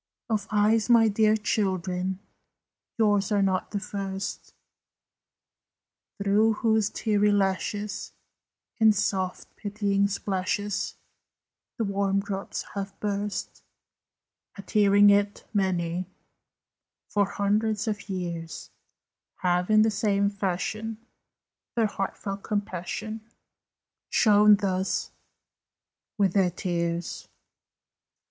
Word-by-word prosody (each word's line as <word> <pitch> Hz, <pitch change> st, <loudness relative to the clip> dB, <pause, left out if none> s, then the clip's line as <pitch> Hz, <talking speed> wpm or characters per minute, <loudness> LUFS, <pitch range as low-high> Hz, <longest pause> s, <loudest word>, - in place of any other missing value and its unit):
Of 210 Hz, -2 st, 0 dB
eyes, 215 Hz, +2 st, +2 dB
my 230 Hz, -2 st, +6 dB
dear 215 Hz, +1 st, +3 dB
children, 190 Hz, -3 st, -1 dB, 0.8 s
Yours 205 Hz, -2 st, +2 dB
are 200 Hz, -1 st, +3 dB
not 185 Hz, -1 st, 0 dB
the 205 Hz, -, -2 dB
first, 195 Hz, -1 st, -5 dB, 1.6 s
Through 205 Hz, +3 st, +3 dB
whose 220 Hz, -1 st, +2 dB
teary 210 Hz, -1 st, +1 dB
lashes, 205 Hz, +1 st, -1 dB, 0.7 s
In 220 Hz, -1 st, +6 dB
soft, 190 Hz, -2 st, -2 dB
pitying 200 Hz, -1 st, 0 dB
splashes, 200 Hz, 0 st, -2 dB, 0.8 s
The 230 Hz, -, 0 dB
warm 195 Hz, -1 st, +1 dB
drops 195 Hz, 0 st, -4 dB
have 195 Hz, -1 st, -5 dB
burst 205 Hz, 0 st, -3 dB, 1.0 s
At 200 Hz, -, -10 dB
hearing 205 Hz, -1 st, +6 dB
it. 205 Hz, 0 st, +1 dB
Many, 180 Hz, -3 st, 0 dB, 1.0 s
For 205 Hz, -1 st, +2 dB
hundreds 210 Hz, +2 st, 0 dB
of 210 Hz, -1 st, -3 dB
years, 170 Hz, -3 st, -5 dB, 0.7 s
Have 180 Hz, +1 st, +1 dB
in 215 Hz, 0 st, +6 dB
the 220 Hz, -, +2 dB
same 200 Hz, -1 st, +1 dB
fashion 205 Hz, +3 st, -3 dB, 0.8 s
Their 230 Hz, -2 st, +3 dB
heartfelt 195 Hz, 0 st, -4 dB
compassion 210 Hz, +2 st, -4 dB, 0.9 s
Shown 210 Hz, -1 st, +6 dB
thus 190 Hz, -1 st, -1 dB, 1.1 s
with 195 Hz, -3 st, +2 dB
their 190 Hz, -3 st, +3 dB
tears! 170 Hz, -1 st, -3 dB
200 Hz, 95 wpm, -27 LUFS, 190-210 Hz, 1.6 s, my